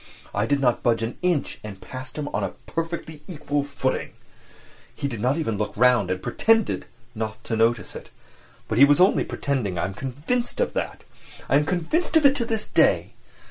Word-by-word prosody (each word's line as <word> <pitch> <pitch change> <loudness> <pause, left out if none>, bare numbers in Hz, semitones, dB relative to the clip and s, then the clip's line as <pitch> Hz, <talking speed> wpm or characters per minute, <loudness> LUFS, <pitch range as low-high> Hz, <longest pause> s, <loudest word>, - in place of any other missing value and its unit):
I 105 +2 0
did 145 +2 +2
not 125 -3 +2
budge 115 -1 +1
an 115 - -3
inch 180 -5 0
and 105 -3 -8
passed 130 +6 -9
him 150 -1 -3
on 105 - 0
a 95 - -3
perfectly 165 -2 -4
equal 145 -5 -2
footing! 140 -2 -2 0.8
He 140 - -2
did 115 -6 -5
not 130 +5 +2
even 115 -11 -2
look 105 -1 -2
round 125 -5 +4
and 95 0 -1
pretended 225 -2 +2 0.3
not 110 -1 -5
to 115 - -2
notice 115 0 +1
it; - - -9 0.6
but 110 - 0
he - - +9
was 145 +3 +6
only 185 +2 +5
pretending, 120 -11 -2
I 85 - 0
am 95 - -4
convinced 145 - -2
of - - 0
that. - - -4 0.4
I - - +2
am 150 +1 +3
convinced 245 - +1
of 315 - +3
that 280 -1 +6
to 235 - 0
this 225 -1 -1
day! - - +2
140 Hz, 195 wpm, -24 LUFS, 115-165 Hz, 0.8 s, he